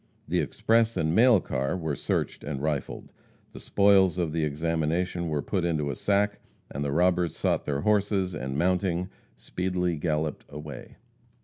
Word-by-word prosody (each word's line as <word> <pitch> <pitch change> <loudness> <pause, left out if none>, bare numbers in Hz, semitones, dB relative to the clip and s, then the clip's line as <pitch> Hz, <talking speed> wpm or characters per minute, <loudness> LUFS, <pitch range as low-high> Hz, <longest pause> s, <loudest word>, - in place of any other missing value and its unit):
The - - +1
express 115 0 +1
and 80 0 +1
mail 115 +1 +6
car 65 +2 -2
were 80 -4 -2
searched - - -2
and 70 -2 -4
rifled. 75 -2 -3 0.4
The - - -9
spoils 100 -3 +4
of 85 -3 0
the 80 0 -1
examination 80 +3 -1
were 75 -3 -1
put 95 -4 -1
into 75 -4 0
a - - -5
sack, 105 +4 0 0.3
and 70 - -3
the 70 - -1
robbers 90 +1 +2
sought - - 0
their 70 -1 -1
horses, 100 -1 +1
and 65 -2 -4
mounting, 90 +1 0 0.3
speedily 90 -2 -2
galloped 75 -1 -2
away. 75 -2 -9
85 Hz, 155 wpm, -27 LUFS, 75-95 Hz, 0.4 s, mail